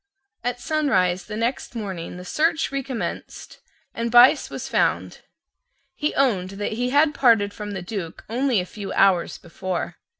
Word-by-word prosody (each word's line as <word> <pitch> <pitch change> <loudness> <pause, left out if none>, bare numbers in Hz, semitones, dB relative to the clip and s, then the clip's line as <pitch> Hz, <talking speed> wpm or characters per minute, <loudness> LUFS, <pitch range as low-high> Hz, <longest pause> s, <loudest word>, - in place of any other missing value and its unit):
At 245 0 -2
sunrise 220 - +1
the 210 0 -6
next 235 +2 -2
morning 190 -6 -5
the 180 - -9
search 315 - +1
recommenced, 260 -9 -5 0.3
and 230 0 -2
Buyse 245 +2 +6
was - - -6
found. - - 0 0.7
He 300 - -2
owned 205 -10 +1
that 205 - -2
he 245 +3 -1
had 295 +3 +3
parted 225 -8 +3
from 205 -1 -6
the 190 -2 -5
Duke 180 -4 -6
only 245 0 +1
a 180 - -2
few 200 +1 -7
hours 190 -3 +3
before. 175 0 -5
220 Hz, 155 wpm, -23 LUFS, 185-260 Hz, 0.7 s, Buyse